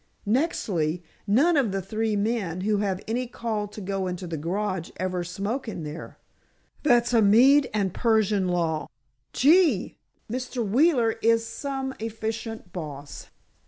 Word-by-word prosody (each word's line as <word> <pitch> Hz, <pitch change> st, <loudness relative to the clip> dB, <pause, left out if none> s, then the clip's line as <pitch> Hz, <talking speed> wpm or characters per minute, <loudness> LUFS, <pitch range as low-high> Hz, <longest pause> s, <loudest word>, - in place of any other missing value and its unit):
Nextly, 190 Hz, -, 0 dB, 0.2 s
none 280 Hz, +12 st, +4 dB
of 265 Hz, -8 st, +2 dB
the 195 Hz, -, -1 dB
three 215 Hz, +3 st, -1 dB
men 200 Hz, -5 st, -1 dB
who 210 Hz, +2 st, +1 dB
have 195 Hz, -2 st, -1 dB
any 245 Hz, +3 st, -1 dB
call 225 Hz, -3 st, -3 dB
to 210 Hz, +1 st, -10 dB
go 195 Hz, -1 st, -2 dB
into 180 Hz, 0 st, -4 dB
the 170 Hz, -2 st, -4 dB
garage 180 Hz, +3 st, -2 dB
ever 185 Hz, 0 st, -2 dB
smoke 200 Hz, +9 st, -3 dB
in 190 Hz, -7 st, -5 dB
there. 150 Hz, +2 st, -8 dB, 0.6 s
That's 240 Hz, -4 st, +3 dB
a 230 Hz, -, +5 dB
Mede 255 Hz, +7 st, +6 dB
and 200 Hz, -4 st, 0 dB
Persian 215 Hz, -4 st, +2 dB
law. 165 Hz, -3 st, 0 dB, 0.4 s
Gee, 305 Hz, -, +3 dB, 0.3 s
Mr. 250 Hz, -1 st, -3 dB
Wheeler 245 Hz, -, +3 dB
is 230 Hz, 0 st, +3 dB
some 265 Hz, +3 st, -4 dB
efficient 225 Hz, -2 st, -5 dB
boss! 145 Hz, -5 st, -7 dB
215 Hz, 140 wpm, -26 LUFS, 185-240 Hz, 0.6 s, Mede